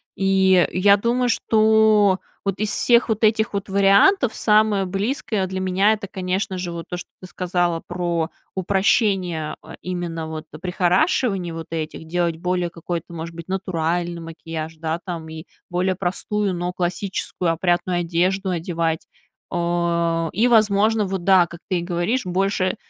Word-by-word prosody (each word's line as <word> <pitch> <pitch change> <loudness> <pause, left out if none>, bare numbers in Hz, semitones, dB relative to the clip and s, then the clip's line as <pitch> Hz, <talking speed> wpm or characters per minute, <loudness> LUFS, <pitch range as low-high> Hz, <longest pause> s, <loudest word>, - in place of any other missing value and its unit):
И 190 -2 +3
я 200 +2 +5
думаю, 245 +4 +1
что 215 -3 +4 0.3
вот 195 -1 -2
из 215 0 0
всех 240 0 +3
вот 220 0 -1
этих 220 0 +2
вот 200 -1 -3
вариантов 200 - +4
самое 210 -2 +3
близкое 200 +1 -2
для 190 0 -4
меня- 190 +3 +2
это, 205 -2 -5
конечно 190 0 -2
же, 180 -1 -4
вот 170 -1 -6
то, 180 - -3
что - - -9
ты 185 - -9
сказала 175 -2 -1
про 175 -2 -2 0.3
упрощение, 190 -4 +1
а, 160 - -11
именно 175 -3 -4
вот 160 0 -6 0.2
прихорашиваний 185 - +1
вот 165 -1 -7
этих. 160 0 -5
Делать 170 -1 0
более 180 +1 -1
какой-то, 170 0 -6
может 165 0 -6
быть, 170 -1 -9
натуральный 175 -2 -2
макияж, 165 -1 -7
да, 160 +1 -2
там, 170 -3 -5
и 160 0 -8 0.3
более 185 +1 0
простую, 195 +2 -1
но 175 0 -2
классическую, 180 -1 -2
опрятную 175 +1 0
одежду 180 +3 0
одевать. 165 -2 -2 0.4
О, 170 -1 0
и, 220 +6 +3
возможно, 215 -1 +3
вот, 190 -2 -3
да, 185 -2 +5
как 170 0 -11
ты 185 - +1
и - - -3
говоришь, 175 +8 -1
больше 185 0 0
180 Hz, 150 wpm, -22 LUFS, 170-200 Hz, 0.4 s, я